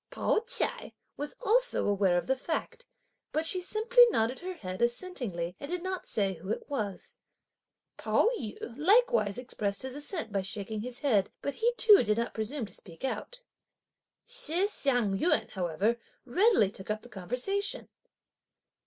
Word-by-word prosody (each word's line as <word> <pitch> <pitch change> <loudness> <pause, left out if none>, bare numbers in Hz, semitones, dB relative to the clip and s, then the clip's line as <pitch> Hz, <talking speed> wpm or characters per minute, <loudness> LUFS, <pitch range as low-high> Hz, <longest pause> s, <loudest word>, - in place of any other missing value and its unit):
Pao - - +1
ch'ai 460 - 0 0.2
was 290 +1 -5
also - - +2
aware 195 -3 +3
of 175 - -1
the 265 - +1
fact, 330 - -4 0.4
but 315 +1 0
she 365 +2 +2
simply 455 +6 +5
nodded 235 - 0
her 370 +1 -6
head 185 - -6
assentingly 235 - -1
and 280 - -7
did 355 0 -2
not 375 0 -4
say 195 -3 0
who 185 +2 -10
it 220 - -3
was. 210 -9 -4 0.8
Pao - - +2
yü 215 -2 -5 0.2
likewise 390 - +3
expressed 210 -5 -3
his 260 -1 -5
assent 290 - -2
by 200 -1 0
shaking 200 +2 -4
his 245 +1 -6
head, 215 -9 +2
but 280 - -1
he 470 +2 +1
too 425 -4 +7
did 210 -1 +1
not 235 0 -1
presume 225 +4 -3
to 195 - -10
speak 170 +5 -7
out. - - -4 0.8
Shih 385 -7 +1
Hsiang 245 - +1
yün, 320 +1 +2
however, 190 +6 0 0.3
readily 360 - +3
took 190 0 -11
up 215 0 -2
the - - -12
conversation. 250 - -2
250 Hz, 160 wpm, -30 LUFS, -, 0.8 s, too